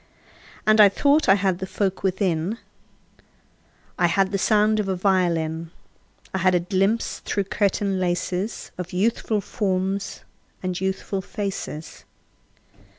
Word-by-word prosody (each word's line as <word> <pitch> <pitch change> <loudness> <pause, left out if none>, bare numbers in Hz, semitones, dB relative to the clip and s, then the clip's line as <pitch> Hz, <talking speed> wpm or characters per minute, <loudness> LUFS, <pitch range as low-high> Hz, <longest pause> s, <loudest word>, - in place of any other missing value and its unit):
And 215 0 +6
I 205 - +9
thought 285 +8 +2
I 195 - +8
had 190 -2 0
the 190 - -4
folk 190 -1 -1
within: 190 0 0 1.4
I 175 - +4
had 190 +3 +2
the 195 - 0
sound 215 +1 +3
of 205 - -1
a 190 - 0
violin; 170 -4 0 0.6
I 190 - 0
had 185 0 +3
a - - +4
glimpse 195 +5 0
through 200 - -1
curtain 195 -1 0
laces 180 +3 -2
Of 180 0 -5
youthful 215 +2 0
forms 195 0 -2 0.4
and 185 -1 -2
youthful 190 0 -2
faces. 195 -6 -5
190 Hz, 130 wpm, -23 LUFS, 180-205 Hz, 1.4 s, I